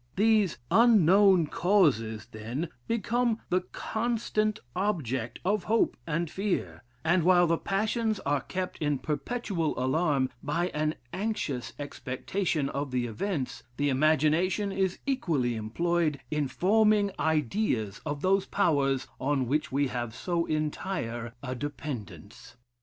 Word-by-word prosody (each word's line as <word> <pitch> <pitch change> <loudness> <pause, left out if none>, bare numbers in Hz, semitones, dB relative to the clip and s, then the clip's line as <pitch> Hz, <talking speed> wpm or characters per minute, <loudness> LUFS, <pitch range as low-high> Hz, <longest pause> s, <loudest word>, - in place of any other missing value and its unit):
These 210 -3 +3
unknown 195 -5 +6
causes, 145 - +2
then, 120 +10 -4 0.2
become 230 +1 +1
the 180 +1 +2
constant 220 +1 -1 0.2
object 130 - -1
of 205 -1 +1
hope 225 +2 +2
and 165 +2 0
fear; 195 +4 -2 0.2
and 175 +3 +4
while 175 +1 +5
the 165 0 +1
passions 215 +2 0
are 140 -1 0
kept 185 +6 -4
in 150 -2 +1
perpetual 160 - -2
alarm 135 0 +1
by 170 +5 -1
an 155 -1 -1 0.2
anxious 185 - -2
expectation 145 +3 -2
of 140 0 -3
the 125 -1 0
events, 130 - -3 0.2
the 145 0 +1
imagination 155 +8 +2
is 190 -1 0
equally 165 - 0
employed 155 +7 0
in 150 -2 0
forming 210 +5 +3
ideas 150 - 0
of 145 -2 -4
those 195 +1 +2
powers 140 -8 +1
on 135 -1 +1
which 150 +5 -1
we 140 0 +1
have 120 -2 -4
so 170 -2 -1
entire 150 -7 -3
a 130 -2 -3
dependence. 130 -7 -7
160 Hz, 125 wpm, -28 LUFS, 135-195 Hz, 0.2 s, unknown